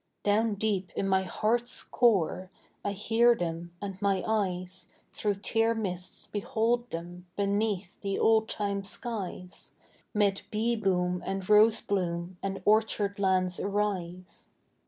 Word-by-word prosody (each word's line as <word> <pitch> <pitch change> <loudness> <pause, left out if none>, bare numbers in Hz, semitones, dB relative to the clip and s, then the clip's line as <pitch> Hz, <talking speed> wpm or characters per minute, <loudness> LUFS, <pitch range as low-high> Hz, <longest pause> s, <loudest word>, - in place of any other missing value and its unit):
Down 210 +1 +2
deep 200 -3 -1
in 195 - 0
my 190 0 +3
heart's 235 +6 -1
core 190 -5 +2 0.3
I 205 - -1
hear 230 +4 +4
them 170 -2 -4
and 195 -1 -5
my 195 -2 +1
eyes 185 -4 -1 0.3
Through 205 -2 0
tear 225 0 +2
mists 185 -5 -3
behold 230 +4 0
them 175 +2 -7
beneath 200 -2 0
the 195 -1 -1
old 220 0 +3
time 200 -2 -2
skies, 195 -4 -5 0.4
'Mid 200 -2 +2
bee 225 +2 +1
boom 180 -4 0
and 190 -1 -3
rose 215 +1 +6
bloom 175 -2 -2
and 195 -1 -4
orchard 210 -2 +2
lands 185 -2 +2
arise. 195 -3 -3
200 Hz, 130 wpm, -29 LUFS, 185-220 Hz, 0.4 s, rose